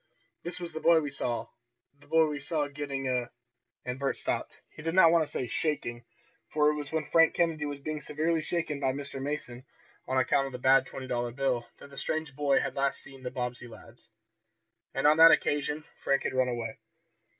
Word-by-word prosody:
"This 175 +1 -4
is 175 -1 -6
the 160 - -4
boy 165 0 +5
we 145 -2 -4
saw 120 -2 -2 0.5
the - - -20
boy 160 +1 +4
we 150 -1 -3
saw 150 0 -1
getting 140 -2 -4
a 125 -1 -1 0.3
" - - -51
And 125 +1 -4
Bert 140 -1 -1
stopped. - - -3
He - - -11
did 165 +2 -2
not 165 -3 +7
want 165 -1 +4
to 150 - -5
say 130 - -1
"shaking," 120 -4 -2 0.4
for 150 0 +3
it - - -2
was 145 -2 -5
when 160 -1 0
Frank 165 -1 +4
Kennedy 160 -3 +1
was 145 -1 -5
being 155 +1 -4
severely 160 +2 0
shaken 155 -3 -2
by 135 -2 +1
Mr. 140 -1 -6
Mason, 135 -3 -4 0.4
on 130 +1 0
account 130 +2 +2
of 135 - -9
the - - -4
bad 130 +1 +4
twenty 130 - -7
dollar 120 -1 -1
bill, 125 -2 -1
that 140 - -13
the 140 - -13
strange 155 -3 -3
boy 140 -1 +3
had - - -3
last 140 0 -1
been - - -12
seen 135 - -13
by - - -13
the 130 - -20
Bobbsey 125 -1 -4
lads. 115 0 -15 0.9
And 135 - 0
on 150 +1 +6
that 165 +1 +10
occasion 150 0 +1 0.2
Frank 140 0 +2
had - - -2
run 130 -1 +2
away. 120 -2 -4
140 Hz, 220 wpm, -29 LUFS, 130-155 Hz, 0.9 s, that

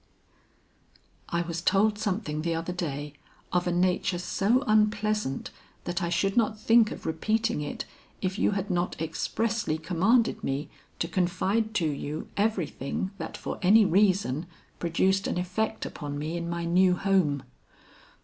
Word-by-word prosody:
"I 170 0 0
was 170 0 -4
told 205 +3 +3
something 195 -7 -2
the 165 +1 -1
other 165 +2 -3
day, 145 -4 -4 0.4
of 180 0 +1
a - - +2
nature 180 0 +1
so 210 +8 +1
unpleasant 215 - +1 0.3
that 175 +2 -2
I 170 - 0
should 195 +3 +1
not 220 -2 +2
think 225 0 +5
of - - -8
repeating 215 +4 0
it, 145 - -4 0.3
if 190 +2 -2
you - - +3
had 195 0 -2
not 175 0 -1
expressly 165 +3 -1
commanded 185 +9 +2
me 140 +2 -2 0.3
to 165 - -1
confide 195 +5 0
to 175 - +2
you 150 +1 -4
everything 190 -5 -1
that 160 - -5
for - - -5
any 210 +4 +6
reason 185 -5 +2 0.3
produced 190 +3 +1
an - - -1
effect 185 +5 -2
upon 145 -2 -5
me 155 +3 -3
in 170 0 -3
my 170 0 -2
new 180 +2 +4
home. 180 -8 +1
180 Hz, 150 wpm, -28 LUFS, 165-210 Hz, 0.4 s, any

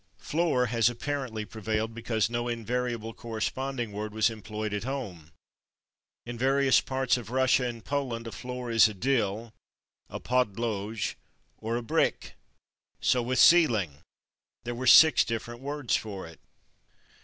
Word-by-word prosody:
/Floor/ 150 -7 0
has 115 -1 +3
apparently 120 -3 -4
prevailed 110 +1 -3
because 115 -1 -1
no 120 +1 -3
invariable 120 -1 -3
corresponding 120 +2 -4
word 105 +1 -5
was 110 +1 +3
employed 110 -1 -5
at 105 - -2
home: 105 - -6 0.9
in 120 -1 -7
various 135 +1 +3
parts 130 -1 0
of 120 -2 -8
Russia 130 0 +2
and 115 -2 -6
Poland 130 -5 -3
a 115 - -6
floor 125 0 -6
is 115 0 +6
a 105 - -7
/dill/, 115 -1 -1 0.6
a - - -6
/podlogé/, 110 -3 -1 0.5
or 115 +2 -2
a 120 - -4
/bricke/. 115 - 0 0.7
So 125 - +2
with 125 +2 -2
/ceiling/. 115 - +5 0.7
There 120 - -4
were 130 +2 -4
six 160 +5 +8
different 120 +1 -5
words 145 -2 -1
for 100 -4 -5
it. 80 0 -13
120 Hz, 140 wpm, -28 LUFS, 110-125 Hz, 0.9 s, six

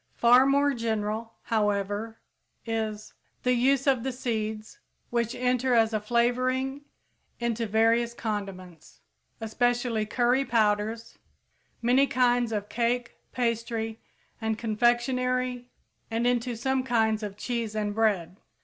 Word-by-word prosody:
Far 245 +3 +6
more 280 +1 +3
general, 225 -1 -2
however, 210 0 -1 0.5
is 220 -2 -3 0.3
the 250 - +3
use 265 +2 +2
of 265 -4 +3
the 265 +2 -2
seeds, 220 -3 -4 0.3
which 235 0 0
enter 250 0 +1
as 225 -1 +3
a 215 - +1
flavoring 255 +4 0 0.6
into 235 -1 -1
various 230 +2 +2
condiments, 195 -7 -6 0.4
especially 235 0 0
curry 245 +4 +2
powders, 220 -2 0 0.6
many 255 +4 +4
kinds 245 -2 +2
of 205 -2 -2
cake, 240 +2 -1
pastry, 230 -2 -2 0.4
and 220 -1 -1
confectionery 245 +2 0 0.4
and 230 +1 -1
into 245 0 +1
some 265 +3 0
kinds 225 -4 +1
of 205 -1 -6
cheese 230 -3 -3
and 210 -1 -1
bread. 200 -5 0
230 Hz, 115 wpm, -27 LUFS, 220-245 Hz, 0.6 s, Far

